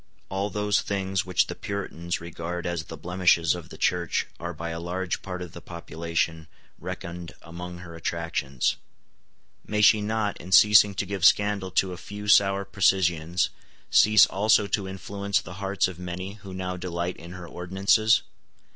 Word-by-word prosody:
All 100 Hz, +2 st, -2 dB
those 105 Hz, 0 st, +1 dB
things 95 Hz, -1 st, -2 dB
which 90 Hz, -, +3 dB
the -, -, -5 dB
Puritans 90 Hz, -4 st, -4 dB
regard 85 Hz, +1 st, -5 dB
as 85 Hz, -3 st, -2 dB
the 80 Hz, -, -9 dB
blemishes 90 Hz, 0 st, +2 dB
of 85 Hz, -2 st, -8 dB
the -, -, -11 dB
Church 85 Hz, -2 st, 0 dB
are 85 Hz, 0 st, -4 dB
by 85 Hz, 0 st, -6 dB
a 85 Hz, -, -4 dB
large 90 Hz, +1 st, -3 dB
part 90 Hz, -2 st, -5 dB
of 90 Hz, -, -9 dB
the -, -, -10 dB
population 85 Hz, -1 st, -3 dB, 0.3 s
reckoned 85 Hz, 0 st, -7 dB
among 90 Hz, +1 st, -8 dB
her 85 Hz, -2 st, -10 dB
attractions. 80 Hz, -6 st, -2 dB, 0.9 s
May 105 Hz, 0 st, -1 dB
she 105 Hz, 0 st, +6 dB
not, 105 Hz, -1 st, -1 dB
in 90 Hz, +2 st, -5 dB
ceasing 105 Hz, -1 st, +7 dB
to 100 Hz, -, -1 dB
give 100 Hz, -2 st, -5 dB
scandal 100 Hz, 0 st, +4 dB
to 95 Hz, -1 st, +2 dB
a -, -, -8 dB
few 105 Hz, +3 st, -8 dB
sour 100 Hz, -1 st, +4 dB
precisians, 90 Hz, -3 st, +1 dB, 0.4 s
cease 105 Hz, -1 st, +7 dB
also 105 Hz, +1 st, +3 dB
to 100 Hz, 0 st, -1 dB
influence 100 Hz, +1 st, -2 dB
the 85 Hz, -, -9 dB
hearts 95 Hz, -1 st, +1 dB
of 90 Hz, -2 st, -9 dB
many 90 Hz, +2 st, -5 dB
who 100 Hz, -2 st, -11 dB
now 90 Hz, 0 st, -4 dB
delight 90 Hz, 0 st, -3 dB
in 85 Hz, +2 st, -10 dB
her 90 Hz, -1 st, -9 dB
ordinances? 100 Hz, +6 st, +2 dB
90 Hz, 165 wpm, -26 LUFS, 85-100 Hz, 0.9 s, ceasing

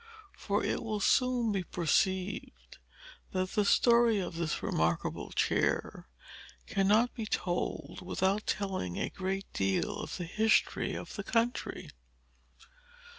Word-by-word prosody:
For 205 Hz, 0 st, -1 dB
it -, -, -1 dB
will 215 Hz, -2 st, -2 dB
soon 245 Hz, +1 st, +2 dB
be 195 Hz, -2 st, 0 dB
perceived 185 Hz, +3 st, -1 dB, 0.5 s
that 185 Hz, 0 st, -1 dB
the 210 Hz, -, +2 dB
story 235 Hz, +1 st, +4 dB
of 180 Hz, -2 st, -4 dB
this 165 Hz, -2 st, -2 dB
remarkable 80 Hz, +1 st, -1 dB
chair -, -, 0 dB, 0.6 s
cannot 210 Hz, +5 st, +3 dB
be 225 Hz, -3 st, -5 dB
told 180 Hz, 0 st, -2 dB
without 190 Hz, +3 st, 0 dB
telling 190 Hz, -, -2 dB
a -, -, -2 dB
great 195 Hz, +1 st, -3 dB
deal 100 Hz, -, 0 dB
of -, -, -5 dB
the 175 Hz, -, -4 dB
history 220 Hz, +6 st, +2 dB
of -, -, -7 dB
the 200 Hz, -, -3 dB
country. 230 Hz, +4 st, -1 dB
195 Hz, 125 wpm, -31 LUFS, 180-220 Hz, 0.6 s, story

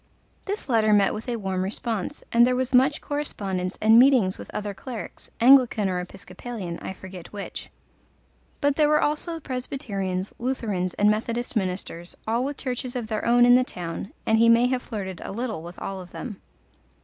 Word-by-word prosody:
This 405 Hz, +2 st, -4 dB
letter 220 Hz, -4 st, +3 dB
met 200 Hz, -1 st, +4 dB
with 220 Hz, +4 st, -6 dB
a 240 Hz, -, 0 dB
warm 190 Hz, -4 st, -2 dB
response, 210 Hz, +1 st, -3 dB
and 235 Hz, 0 st, +6 dB
there 250 Hz, -, +2 dB
was 260 Hz, +1 st, -1 dB
much 265 Hz, +4 st, +4 dB
correspondence 195 Hz, -11 st, -3 dB
and 220 Hz, +2 st, +6 dB
meetings 245 Hz, -8 st, +5 dB
with -, -, -10 dB
other 205 Hz, -1 st, -4 dB
clerics 235 Hz, +2 st, -8 dB
Anglican 245 Hz, -4 st, +6 dB
or 180 Hz, -1 st, -1 dB
Episcopalian, 185 Hz, +1 st, -7 dB
I -, -, -5 dB
forget 185 Hz, -2 st, -10 dB
which. 205 Hz, -1 st, -7 dB, 0.9 s
But 285 Hz, -1 st, +2 dB
there 300 Hz, -1 st, +4 dB
were 300 Hz, 0 st, +4 dB
also 315 Hz, +3 st, -1 dB
Presbyterians, 210 Hz, -9 st, -3 dB
Lutherans, 215 Hz, -8 st, -2 dB
and 205 Hz, +1 st, +4 dB
Methodist 230 Hz, +3 st, -2 dB
ministers, 180 Hz, -3 st, -3 dB
all 230 Hz, +3 st, +1 dB
with 285 Hz, +1 st, -3 dB
churches 255 Hz, -1 st, -4 dB
of 245 Hz, -2 st, -2 dB
their 215 Hz, -1 st, -2 dB
own 240 Hz, +1 st, +5 dB
in 245 Hz, -, +7 dB
the 255 Hz, +1 st, +6 dB
town, 175 Hz, -4 st, -6 dB
and 220 Hz, 0 st, +3 dB
he 230 Hz, 0 st, +6 dB
may 230 Hz, +1 st, +6 dB
have 255 Hz, -1 st, 0 dB
flirted 190 Hz, -7 st, -6 dB
a -, -, -6 dB
little 225 Hz, -4 st, -3 dB
with 175 Hz, +2 st, -10 dB
all 195 Hz, -1 st, -5 dB
of 180 Hz, -, -11 dB
them. 210 Hz, -1 st, -7 dB
225 Hz, 185 wpm, -25 LUFS, 190-255 Hz, 0.9 s, in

